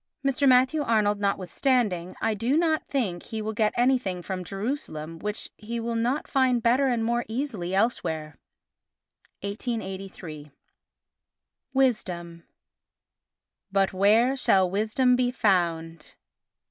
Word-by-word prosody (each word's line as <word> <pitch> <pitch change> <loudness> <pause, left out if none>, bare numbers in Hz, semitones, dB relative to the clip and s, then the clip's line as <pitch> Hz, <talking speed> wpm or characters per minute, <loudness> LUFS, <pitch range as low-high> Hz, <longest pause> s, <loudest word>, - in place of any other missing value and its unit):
Mr. 275 0 +3
Matthew 260 +4 +4
Arnold 215 -5 +2
notwithstanding, 200 -1 0
I 225 - +1
do 235 +8 0
not 320 -2 +1
think 200 -11 -1
he 220 - -6
will 215 0 -3
get 215 -1 +2
anything 240 -8 +1
from 185 -1 -4
Jerusalem 180 - -5
which 210 +3 -5
he 230 +2 -5
will 230 +1 -3
not 240 +6 0
find 255 -4 +2
better 255 +4 +3
and 235 -3 0
more 235 +1 +1
easily 220 -7 -3
elsewhere. 160 - -1 1.0
[1883.] 195 - -5 1.3
Wisdom 175 -10 0 1.3
But 195 -1 +2
where 220 +7 +4
shall 190 -8 +3
wisdom 220 +7 +2
be 250 0 +1
found? 170 -8 0
215 Hz, 115 wpm, -26 LUFS, 185-250 Hz, 1.3 s, Matthew